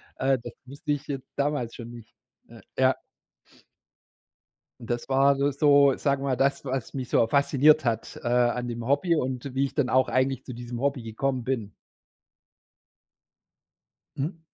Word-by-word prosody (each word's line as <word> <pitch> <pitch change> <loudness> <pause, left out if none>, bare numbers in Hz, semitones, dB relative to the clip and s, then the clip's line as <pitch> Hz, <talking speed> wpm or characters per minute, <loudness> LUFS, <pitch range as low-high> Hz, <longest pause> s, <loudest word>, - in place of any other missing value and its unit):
äh, 135 0 +1
das 120 0 -8
wusste 145 +3 -3
ich 145 +1 -5
jetzt 135 -2 -5
damals 140 -5 -1
schon 120 -1 -8
nicht, 115 -2 -13 0.3
ne? - - -15 0.2
Ja. - - +4 1.8
Und 115 - -11
das 120 +2 -3
war 135 +1 +4
s 140 0 -1
so, 140 -2 +6
sagen 140 -1 0
wir 140 - -1
mal, 130 - +2
das, 135 +1 +1
was 130 -3 -4
mich 130 -2 -5
so - - +4
fasziniert 145 +3 +4
hat, 115 -2 -2
äh, - - -3
an 120 0 +1
dem 120 -1 -5
Hobby 145 +5 +2
und 130 -3 -2
wie 135 +1 +1
ich - - -7
dann 140 -5 +1
auch 130 0 +3
eigentlich 130 0 0
zu 130 - -7
diesem 120 0 -7
Hobby 140 -3 -1
gekommen 125 +3 -2
bin. 115 -6 -3 2.4
Mhm. 165 +5 -3
135 Hz, 165 wpm, -26 LUFS, 120-140 Hz, 2.4 s, so